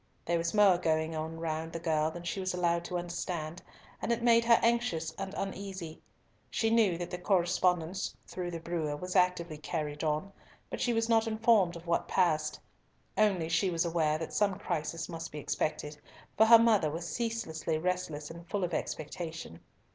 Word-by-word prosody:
There 170 0 +1
was 170 +4 -1
more 200 -4 +6
going 160 -1 0
on 160 +1 -4
round 160 0 -3
the 165 - -3
girl 155 -2 +1
than 175 +2 -8
she 175 +3 -3
was 185 -1 -2
allowed 170 -1 +1
to 180 - -2
understand, 175 -1 -4 0.4
and - - -1
it 235 0 0
made 235 -1 +5
her 230 0 +7
anxious 230 -9 +1
and 195 0 -5
uneasy. 190 -4 -5 0.5
She 225 -1 0
knew 215 -7 +4
that 175 0 -5
the 180 - -4
correspondence 180 -1 +1
through 180 -1 -5
the 170 -1 -5
brewer 160 -3 -2
was 180 +5 -6
actively 180 -4 +2
carried 150 -2 -3
on, 155 +6 -1 0.4
but - - -4
she 245 - +2
was 225 -1 +1
not 225 -1 +3
informed 220 -5 +3
of 170 0 -10
what 170 0 0
passed. 155 -4 +1 0.6
Only 195 -6 +2
she 185 +4 +2
was 170 -1 0
aware 160 -2 +1
that 160 0 -6
some 200 -2 +2
crisis 165 -4 -3
must 165 -1 -6
be 150 - -7
expected, 150 0 -2 0.4
for 220 - +5
her 230 0 +10
mother 220 -8 +4
was 165 +3 -4
ceaselessly 220 -10 -2
restless 165 -3 -2
and 170 +1 -11
full 200 -1 -1
of 175 -1 -2
expectation. 160 - -5
175 Hz, 185 wpm, -31 LUFS, 160-195 Hz, 0.6 s, her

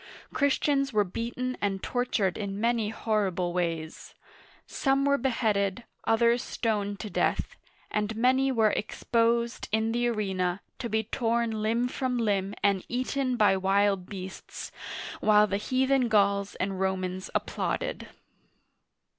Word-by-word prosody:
Christians 280 -1 +2
were 210 -2 +3
beaten 235 +6 -4
and 195 -2 -1
tortured 245 -7 0
in 200 -1 -4
many 230 -1 +1
horrible 195 -6 -1
ways. 165 -3 -3 0.5
Some 275 0 +1
were 280 0 +3
beheaded, 220 -4 0 0.2
others 235 +1 +3
stoned 205 -4 -2
to 215 - -5
death, - - 0 0.4
and 210 +1 -1
many 260 +4 +3
were 220 -4 +3
ex 210 - -5
posed 235 0 +1
in 220 +1 +1
the 240 +1 +1
arena, 190 -5 -1 0.2
to 235 - -3
be 220 0 +1
torn 235 +1 0
limb 230 +3 +1
from 255 0 -2
limb 200 -3 0
and 200 -2 +2
eaten 255 +1 -1
by 210 -3 +5
wild 195 0 +2
beasts, 190 -1 -7 0.5
while 210 0 +5
the 200 -1 -1
heathen 260 +3 +2
Gauls 200 -2 +2
and 190 0 -2
Romans 185 -1 -2
applauded. - - -2
215 Hz, 130 wpm, -28 LUFS, 195-240 Hz, 0.5 s, by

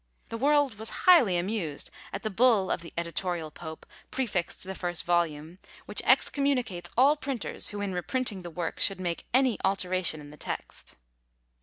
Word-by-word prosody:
The 230 - -4
world 285 -4 +3
was 220 - -4 0.2
highly 255 - +7
amused 175 -5 -3 0.2
at - - -5
the 215 - -2
bull 220 -2 +4
of - - 0
the 170 - -10
editorial 170 -1 -2
Pope 160 0 -9 0.2
prefixed 210 -10 -2
to - - -12
the 190 - -3
first 175 -2 -2
volume, 170 -1 0 0.3
which - - -2
excommunicates 250 -11 +2
all 275 +4 +6
printers 275 -7 -3
who 205 0 -5
in 200 -2 -2
reprinting 205 +3 -2
the 175 - -7
work 170 0 -4
should 195 -2 +2
make 175 -2 -3
any 255 -2 +3
alteration 185 -4 +1
in 145 -1 -11
the 150 - -13
text! - - -6
190 Hz, 170 wpm, -28 LUFS, 175-240 Hz, 0.3 s, highly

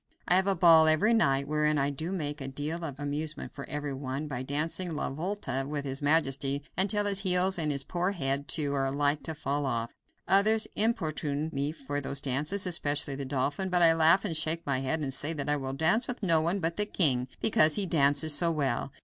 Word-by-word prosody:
I - - +3
have 190 +1 +2
a 195 - +2
ball 165 -2 +6
every 155 +9 +3
night, 140 -11 +2
wherein 150 0 +1
I 140 0 0
do 160 +5 -5
make 150 -6 -4
a 135 - -5
deal 150 +5 -4
of 140 -4 -6
amusement 150 +2 -4
for 140 - -9
every 145 -1 -4
one 135 +2 -5
by 130 -4 -5
dancing 155 +5 -3
La 150 - -2
Volta 160 -3 -3
with 145 -1 -4
his 135 +1 -4
majesty 140 -2 +1
until 205 +3 +2
his 200 -1 +2
heels, 185 -1 +2
and 155 -2 0
his 140 -1 -2
poor 175 +5 -2
old 200 - -2
head, 140 -3 -2
too, 145 0 0
are 135 -1 0
like 145 +1 0
to 160 - -5
fall 145 0 -2
off. 115 -2 -3 0.3
Others 215 +4 +3
importune 155 - -1
me 140 +2 -2
for 145 -2 -5
those 140 0 -1
dances, 150 +9 -1
especially 145 -5 -1
the 140 0 -5
dauphin, 140 +8 -2
but 180 -1 +2
I 165 -1 +6
laugh 165 +5 +4
and 170 -6 0
shake 160 +2 -1
my 140 -2 0
head 135 +4 -2
and 135 -2 -3
say 145 +4 -2
that 145 -3 -5
I 150 - +2
will 135 -2 -4
dance 160 - +1
with 250 -3 -4
no 165 -4 +4
one 170 +5 -1
but 165 -1 -2
the 210 0 +1
king, 130 -11 +1
because 155 -8 +4
he 200 - +2
dances 150 -2 +2
so 170 +3 +2
well. 140 -4 -2
150 Hz, 225 wpm, -28 LUFS, 140-175 Hz, 0.3 s, ball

